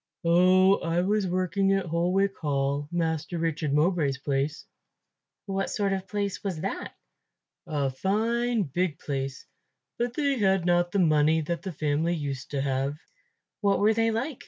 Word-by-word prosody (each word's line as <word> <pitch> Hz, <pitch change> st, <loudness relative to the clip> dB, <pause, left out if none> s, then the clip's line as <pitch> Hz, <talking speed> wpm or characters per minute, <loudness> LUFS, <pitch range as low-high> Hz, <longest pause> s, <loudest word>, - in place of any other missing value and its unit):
"Oh, 185 Hz, +3 st, +5 dB
I 170 Hz, +1 st, 0 dB
was 200 Hz, +1 st, +1 dB
working 185 Hz, +2 st, +1 dB
at 195 Hz, -1 st, 0 dB
Holwick 180 Hz, +4 st, +1 dB
Hall, 140 Hz, -1 st, -1 dB
Master 165 Hz, -1 st, -1 dB
Richard 160 Hz, -2 st, -1 dB
Mowbray's 150 Hz, -2 st, +2 dB
place." 140 Hz, +2 st, -2 dB, 0.8 s
"What 195 Hz, -1 st, -2 dB
sort 200 Hz, -2 st, 0 dB
of 195 Hz, -, 0 dB
a 190 Hz, -, -15 dB
place 200 Hz, -1 st, -3 dB
was 185 Hz, -6 st, -3 dB
that?" -, -, -4 dB, 0.7 s
"A 140 Hz, -3 st, -1 dB
fine 225 Hz, -, 0 dB
big 170 Hz, 0 st, -1 dB
place, 135 Hz, -3 st, -4 dB, 0.5 s
but 240 Hz, +1 st, -1 dB
they 280 Hz, -4 st, 0 dB
had 190 Hz, -3 st, +2 dB
not 175 Hz, 0 st, +2 dB
the 200 Hz, -, 0 dB
money 160 Hz, -2 st, +3 dB
that 170 Hz, +2 st, -3 dB
the 190 Hz, -, -5 dB
family 155 Hz, +2 st, 0 dB
used 140 Hz, -4 st, -5 dB
to 140 Hz, -2 st, -2 dB
have." 135 Hz, +1 st, -1 dB, 0.6 s
"What 200 Hz, -2 st, +2 dB
were 215 Hz, +2 st, +4 dB
they 225 Hz, +1 st, +2 dB
like?" 240 Hz, +5 st, -2 dB
175 Hz, 160 wpm, -27 LUFS, 150-195 Hz, 0.8 s, Oh